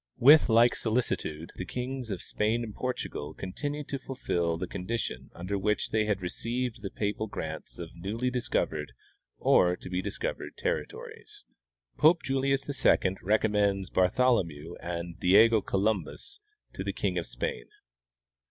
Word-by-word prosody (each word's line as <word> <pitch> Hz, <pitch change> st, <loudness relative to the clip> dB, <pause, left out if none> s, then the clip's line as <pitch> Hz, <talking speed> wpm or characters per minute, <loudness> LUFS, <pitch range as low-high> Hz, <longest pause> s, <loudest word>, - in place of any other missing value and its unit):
With 145 Hz, +3 st, +7 dB
like 115 Hz, +2 st, +6 dB
solicitude 110 Hz, -9 st, -2 dB
the -, -, -3 dB
kings 125 Hz, +4 st, -4 dB
of 95 Hz, -4 st, -4 dB
Spain 110 Hz, +3 st, 0 dB
and 110 Hz, -2 st, -6 dB
Portugal 90 Hz, -12 st, -4 dB
continued 145 Hz, +10 st, -4 dB
to 140 Hz, -, -2 dB
fulfill 85 Hz, -11 st, -1 dB
the 90 Hz, -, -3 dB
condition 90 Hz, -, -4 dB
under 95 Hz, +3 st, -3 dB
which 105 Hz, +2 st, 0 dB
they 110 Hz, -1 st, +2 dB
had 100 Hz, -3 st, -1 dB
received 115 Hz, +5 st, -3 dB
the 100 Hz, -, -4 dB
papal 105 Hz, +2 st, -2 dB
grants -, -, -6 dB
of 85 Hz, -1 st, -7 dB
newly 110 Hz, +9 st, -2 dB
discovered, 125 Hz, -2 st, -1 dB, 0.4 s
or 90 Hz, 0 st, +4 dB
to -, -, -10 dB
be 90 Hz, 0 st, 0 dB
discovered, -, -, -4 dB
territories." -, -, -5 dB, 0.5 s
Pope 160 Hz, +3 st, +5 dB
Julius 135 Hz, 0 st, 0 dB
II 95 Hz, -9 st, +2 dB
Recommends 100 Hz, -2 st, +1 dB
Bartholomew 90 Hz, -, +2 dB
and 85 Hz, 0 st, -5 dB
Diego 110 Hz, +4 st, +6 dB
Columbus 100 Hz, -, -2 dB, 0.3 s
to 95 Hz, -, -4 dB
the 100 Hz, 0 st, -2 dB
King 90 Hz, -3 st, -1 dB
of 85 Hz, -, -5 dB
Spain. -, -, -3 dB
105 Hz, 140 wpm, -29 LUFS, 90-125 Hz, 0.5 s, With